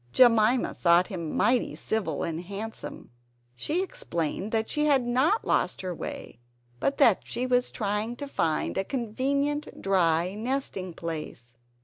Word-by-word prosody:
Jemima 235 -1 +5
thought 175 +1 +4
him 170 -6 -4
mighty 245 0 +2
civil 220 -2 -2
and 165 0 -3
handsome. 205 - -7 0.4
She 315 - 0
explained 215 - -3
that 220 -1 +1
she 300 -1 0
had 275 -4 +3
not 265 - +2
lost - - +1
her 185 -1 -3
way, 140 - -7 0.4
but 275 - 0
that 235 -9 +5
she 245 +2 -3
was 250 -1 +2
trying 210 +2 -2
to 285 +3 -6
find 160 - 0
a - - +1
convenient 280 +6 -1
dry 180 -2 +2
nesting 215 -6 -3
place. 155 -8 -6
220 Hz, 140 wpm, -27 LUFS, 180-260 Hz, 0.4 s, Jemima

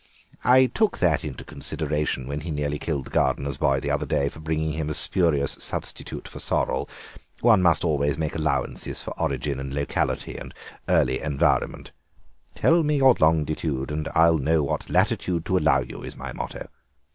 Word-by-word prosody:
I 130 +2 +6
took 215 - 0
that 80 -5 +2
into 75 -5 -6
consideration 75 -3 -3
when 70 +1 -3
he 85 - -6
nearly 75 -1 -2
killed 70 -5 -2
the - - -10
gardener's 70 -1 0
boy 70 -1 +2
the - - -2
other - - -1
day 70 0 +1
for 80 - -12
bringing 80 0 -1
him 80 -1 -3
a 75 - -1
spurious 80 -6 +2
substitute - - -4
for - - -9
sorrel. - - -1 0.5
One 110 -5 +5
must 85 -2 +3
always 75 -3 +1
make 80 -2 -2
allowances 75 -4 -1
for - - -6
origin 70 0 -1
and 70 0 -5
locality 70 0 -2
and - - -9 0.3
early 65 - +2
environment; 70 -1 0 0.6
'Tell 165 +1 +4
me 150 -1 +1
your 135 -3 +6
longitude 75 -3 +1
and 75 0 -3
I'll 80 -1 +5
know 80 +2 +2
what 70 - -3
latitude 85 -3 +1
to 95 - +1
allow 70 -4 +3
you,' - - -8
is - - -8
my - - -6
motto." - - -6
75 Hz, 175 wpm, -25 LUFS, 70-85 Hz, 0.6 s, I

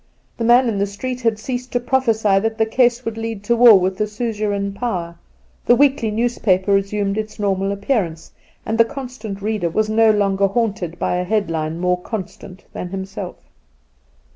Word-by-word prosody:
The 235 - -3
man 240 +2 +5
in 210 -4 -1
the 200 - +1
street 250 +5 -5
had 225 -3 +1
ceased 250 +3 -5
to 245 - +2
prophesy 225 -6 +2
that 220 +2 -2
the 220 - +2
case 245 +2 +2
would 225 0 -4
lead 225 -3 -5
to 235 +3 +2
war 235 -4 +8
with 185 +1 -1
the 210 - 0
suzerain 210 -2 -2
power, 185 -7 -3 0.5
the 240 - +6
weekly 270 -3 +3
newspaper 210 -4 +1
resumed 200 +1 0
its 215 0 -6
normal 195 -1 0
appearance, 200 -6 -2 0.3
and 225 +1 -2
the 230 - +7
'constant 235 -6 -7
reader' 210 -5 -1
was 215 +5 0
no 225 0 +4
longer 200 -2 +2
haunted 195 -5 -2
by 180 - -1
a 180 - -1
headline 165 -6 -1
more 180 0 0
constant 190 -2 -7
than - - -5
himself. 190 0 -6
210 Hz, 175 wpm, -20 LUFS, 195-230 Hz, 0.5 s, war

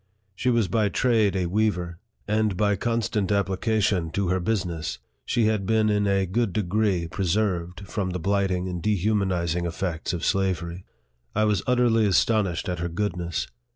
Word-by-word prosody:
She 125 +6 -1
was 115 -4 +2
by 105 +3 +1
trade 110 -4 +2
a 90 -2 0
weaver; 90 -3 -1 0.3
and 105 -2 +1
by 105 -1 +2
constant 110 -2 -1
application 100 -2 +1
to 100 -3 0
her 95 +1 +1
business, 85 -6 -2 0.3
she 115 - +1
had 105 -3 0
been 110 -1 +3
in 105 -1 +1
a 100 -1 +2
good 100 +1 -1
degree 100 -3 0
preserved 90 -1 -1
from 95 -2 -2
the 90 - -2
blighting 95 0 0
and 90 -2 -4
dehu 105 +2 +1
manizing 90 -4 0
effects 85 -1 -3
of 90 - -3
slavery. 90 -2 -1 0.5
I 110 - +3
was 105 -3 +2
utterly 120 -3 +3
astonished 100 -3 +1
at 90 -2 -2
her 85 0 -2
goodness. 85 -2 -2
100 Hz, 160 wpm, -25 LUFS, 90-110 Hz, 0.5 s, been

